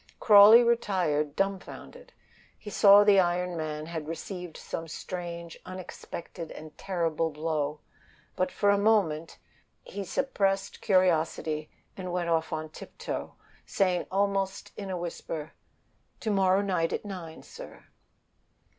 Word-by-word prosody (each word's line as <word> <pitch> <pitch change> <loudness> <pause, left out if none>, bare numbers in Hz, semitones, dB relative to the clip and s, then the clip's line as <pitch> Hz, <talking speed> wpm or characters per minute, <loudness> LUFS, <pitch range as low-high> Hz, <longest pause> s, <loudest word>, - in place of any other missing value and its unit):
Crawley 215 +2 +9
retired 180 -11 +1
dumfounded. 200 - -4 0.5
He 210 - -9
saw 200 0 +7
the 205 -2 +6
iron 180 0 +1
man 155 -1 -4
had 160 -2 -6
received 175 +1 -6
some 165 - -6
strange, 170 0 -7
unexpected 175 -2 -8
and 155 0 -10
terrible 165 -4 -1
blow; 150 -1 -2 0.5
but 185 - 0
for 205 - +2
a 200 - +2
moment 190 -7 +1 0.5
awe 200 - -6
suppressed 195 -2 -1
curiosity, 160 -5 +1 0.3
and 185 -1 -6
he - - -4
went 175 -1 -1
off 165 -1 0
on 155 0 -4
tiptoe, - - -7 0.3
saying 185 -3 0
almost 195 0 -1
in 200 -2 -6
a 185 - -2
whisper, 165 -2 -5 0.7
"To 220 - -1
morrow 190 -1 +3
night 180 -4 0
at - - -3
nine, 175 -5 -8
sir." - - -12
180 Hz, 130 wpm, -28 LUFS, 160-200 Hz, 0.7 s, Crawley